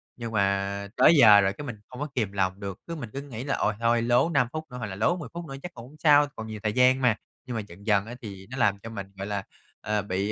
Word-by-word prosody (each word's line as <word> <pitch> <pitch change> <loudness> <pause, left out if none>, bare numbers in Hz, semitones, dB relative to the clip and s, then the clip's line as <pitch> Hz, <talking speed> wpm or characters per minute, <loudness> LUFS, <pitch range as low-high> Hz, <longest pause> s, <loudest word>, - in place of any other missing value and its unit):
nhưng 115 -1 -6
mà 100 -1 0
tới 160 - +7
giờ 105 -7 +8
rồi 100 0 +1
cái 145 - -8
mình 120 - -5
không 125 - -10
có 150 - -2
kiềm 105 -6 0
lòng 95 -1 -1
được, 100 -2 -6
cứ 170 - -4
mình 130 -8 -6
cứ 140 - -4
nghĩ 130 -4 -7
là 135 -1 -1
ôi 105 - +1
thôi 115 0 +2
lố 120 +7 +3
5 135 -7 +2
phút 155 - -3
nữa 125 - -7
hoặc 120 - -4
là 95 - -6
lố 140 - +1
10 145 -8 -7
phút 170 0 -6
nữa 135 -4 -7
chắc 180 - -7
cũng 120 0 -10
không 150 - -17
sao, 145 -2 +6
còn 110 0 -6
nhiều 110 -1 -6
thời 105 -1 0
gian 130 +1 +4
mà. 125 -4 +4 0.3
Nhưng 125 -2 -5
mà 110 - -1
dần 95 +5 -14
dần 100 -1 +3
á 120 - -8
thì 100 -4 -9
nó 130 - -7
làm 100 -5 +2
cho 115 - -9
mình, 100 -3 -6
gọi 100 - -5
là, 100 -2 -2 0.4
ờ, 105 -1 0
bị, 100 +1 -2
115 Hz, 305 wpm, -27 LUFS, 100-130 Hz, 0.4 s, giờ